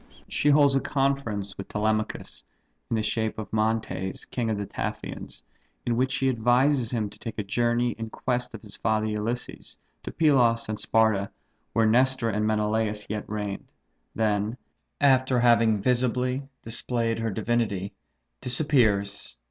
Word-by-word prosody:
She 145 - +1
holds 145 -1 +6
a 135 - +3
conference 135 -9 -1
with 100 - -5
Telemachus, 110 +1 -2 0.5
in - - +1
the 110 - 0
shape 110 +1 -1
of 110 -1 -7
Mantes, 110 -3 -1
king 120 -3 -2
of 110 - 0
Taphians; - - -5 0.4
in 120 - +1
which 130 +2 +1
she 135 -1 +1
advises 125 +1 +3
him 115 -4 -1
to - - -15
take 115 - -6
a 105 - -1
journey 120 +4 +1
in 115 0 -4
quest 125 0 -2
of 110 - -10
his 105 -2 -9
father 110 0 0
Ulysses, 110 +3 -4 0.2
to - - -6
Pylos 125 -7 +3
and 110 0 -3
Sparta, 110 -3 +2 0.4
where 115 - +3
Nestor 125 +1 +3
and 105 +1 0
Menelaus 105 0 0
yet 105 -1 -4
reigned; 105 -2 -4 0.4
then, 105 +1 0 0.4
after 130 -2 +4
having 115 -2 +4
visibly 125 +3 0
displayed 115 0 -1
her 115 0 -1
divinity, 105 -3 -1 0.5
disappears. 115 - +1
115 Hz, 145 wpm, -26 LUFS, 105-125 Hz, 0.5 s, holds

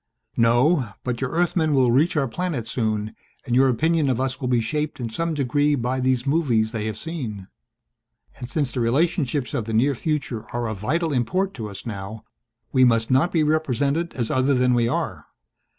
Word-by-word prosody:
"No. 120 - +3
But 125 -1 -3
your 135 - -1
Earthmen 160 -2 +1
will 130 -3 +4
reach 155 +7 +2
our 140 -2 +2
planet 150 -4 -3
soon 110 -2 -2 0.3
and 120 -3 0
your 135 +1 +5
opinion 155 +4 +2
of 125 -2 0
us 130 0 -2
will 130 - -1
be 125 -1 +2
shaped 150 +6 -2
in 120 -2 -3
some 165 +6 -2
degree 145 +2 +1
by 125 0 -1
these 130 0 +1
movies 130 -8 +1
they 110 -2 -3
have 110 -1 -4
seen. 115 - -6 0.9
And 120 -1 -7
since 140 -3 -1
the 125 - -3
relationships 140 +2 0
of 115 - -1
the 115 - -4
near 135 +6 +3
future 135 -5 -3
are 120 -1 -1
of 110 -3 -5
vital 160 - 0
import 185 +10 0
to 110 -5 -6
us 100 -1 -9
now 105 0 -6 0.5
we 130 -2 +4
must 115 -2 +3
not 135 +7 +3
be 160 -3 +2
represented 150 +1 0
as 120 -4 -2
other 130 +2 +2
than 125 0 +3
we 120 -1 +2
are. - - -3
130 Hz, 195 wpm, -23 LUFS, 115-150 Hz, 0.9 s, your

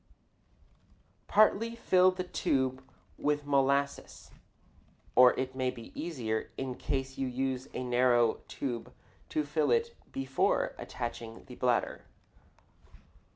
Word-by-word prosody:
Partly 220 +2 +4
fill 185 -5 +4
the 185 0 -3
tube 130 -6 0 0.4
with 145 0 0
molasses 140 0 0 0.8
(or 125 -1 +7
it 130 0 -2
may 130 -1 0
be 115 -2 -9
easier 120 -10 -3
in 130 -1 -3
case 135 0 -3
you 135 - 0
use 130 0 -2
a 130 - -2
narrow 120 -2 +3
tube 120 -4 -4 0.4
to 155 - 0
fill 150 +1 +1
it 465 0 +1 0.2
before 135 0 0
attaching 115 -2 -6
the 125 - -11
bladder). 125 -1 0
135 Hz, 110 wpm, -31 LUFS, 125-150 Hz, 0.8 s, or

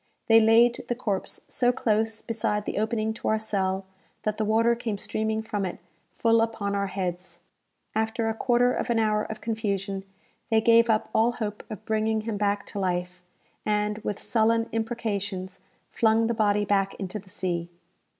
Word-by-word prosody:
They 225 0 +7
laid 230 +2 +5
the 240 - -1
corpse 210 -6 -3
so 245 -1 +2
close 220 -1 0
beside 210 -2 -1
the - - -2
opening 220 0 0
to 225 - -6
our 220 - +3
cell, 195 -3 -1 0.4
that 215 0 -1
the 220 - 0
water 225 +2 +3
came 230 -3 -3
streaming 220 +2 -1
from 205 -2 -2
it 185 - -3 0.3
full 230 +4 +3
upon 220 -3 -1
our 200 0 0
heads. 180 -2 -4 0.5
After 220 +1 0
a 225 - +1
quarter 245 +1 +2
of - - -2
an 235 - +2
hour 215 -1 +2
of 220 -1 -7
confusion, 200 -3 -2 0.5
they 225 -1 +4
gave 230 +1 +5
up 215 -1 +2
all 230 +2 +3
hope 210 -3 -4
of 215 - -8
bringing 220 0 +1
him 215 -1 -3
back 205 0 0
to 205 - -3
life, 180 -1 -2 0.4
and, 210 0 0
with 205 -2 -3
sullen 230 0 +2
imprecations, 205 -5 -3 0.3
flung 225 0 +3
the 235 - +1
body 210 -2 +2
back 195 -1 +1
into 195 +2 -5
the 190 - -17
sea. 175 -2 -2
215 Hz, 175 wpm, -26 LUFS, 200-225 Hz, 0.5 s, They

